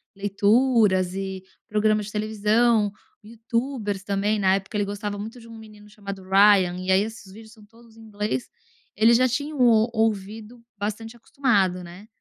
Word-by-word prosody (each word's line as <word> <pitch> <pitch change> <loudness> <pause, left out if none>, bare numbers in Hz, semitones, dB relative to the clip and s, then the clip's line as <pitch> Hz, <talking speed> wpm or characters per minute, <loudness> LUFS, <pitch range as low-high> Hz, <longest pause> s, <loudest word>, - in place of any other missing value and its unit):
leituras 205 -1 +2
e 190 -1 -5 0.2
programas 215 0 +1
de - - -8
televisão, 215 +1 +1 0.3
youtubers 230 -2 -4
também, 205 +1 -1
na 190 -1 +3
época 195 +2 -5
ele 205 - 0
gostava 205 0 -5
muito 220 +4 -8
de 230 - -15
um 230 0 -11
menino 210 -1 -15
chamado 200 -2 -8
Ryan, 190 -1 +4
e 185 +1 -2
aí 190 +1 +4
esses 220 -3 -9
vídeos 220 +1 -14
são 215 -2 -18
todos 225 +1 -21
em - - -14
inglês, 210 - -4 0.5
ele 225 +3 +5
já 255 +2 +4
tinham 285 +4 -3
um - - +4
o 225 -1 +4
ouvido 220 +1 -3
bastante 220 +3 -5
acostumado, 200 -8 0
né. 175 +4 -12
210 Hz, 165 wpm, -24 LUFS, 200-225 Hz, 0.5 s, ele